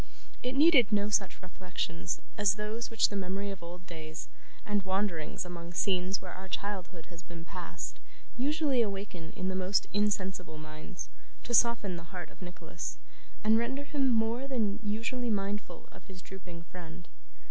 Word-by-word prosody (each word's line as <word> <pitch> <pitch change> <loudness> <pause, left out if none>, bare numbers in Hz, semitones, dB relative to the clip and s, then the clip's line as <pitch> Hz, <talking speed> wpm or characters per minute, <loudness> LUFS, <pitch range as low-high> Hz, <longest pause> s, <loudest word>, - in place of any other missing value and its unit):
It 250 +1 -1
needed 280 -7 +8
no 205 0 +3
such 195 -2 +1
reflections 180 - -2 0.2
as 205 -2 +4
those 215 +3 -2
which 225 -2 +5
the 205 - -4
memory 195 +1 -1
of 195 -3 -7
old 175 +1 -8
days, 160 -2 -6 0.4
and 205 -1 +2
wanderings 190 -2 0
among 170 -1 -6
scenes 185 +1 +3
where 185 - -7
our 190 +1 -7
childhood 190 -4 -3
has 170 0 -8
been 170 -2 -9
passed, - - -5 0.4
usually 285 -1 +3
awaken 195 -6 -2
in 185 -3 -1
the - - 0
most 190 +2 +3
insensible 190 -5 +1
minds, 155 +4 -7 0.3
to 240 - -3
soften 220 -6 +5
the 170 0 -9
heart 180 -3 -6
of - - -18
Nicholas, 180 0 -5 0.5
and 220 +1 +6
render 265 +4 0
him 280 -2 +2
more 230 +3 +2
than 220 -6 +1
usually 235 +4 0
mindful 200 -3 -1
of - - -13
his 185 -1 -10
drooping 180 -3 -9
friend. 170 0 -9
195 Hz, 160 wpm, -32 LUFS, 180-220 Hz, 0.5 s, needed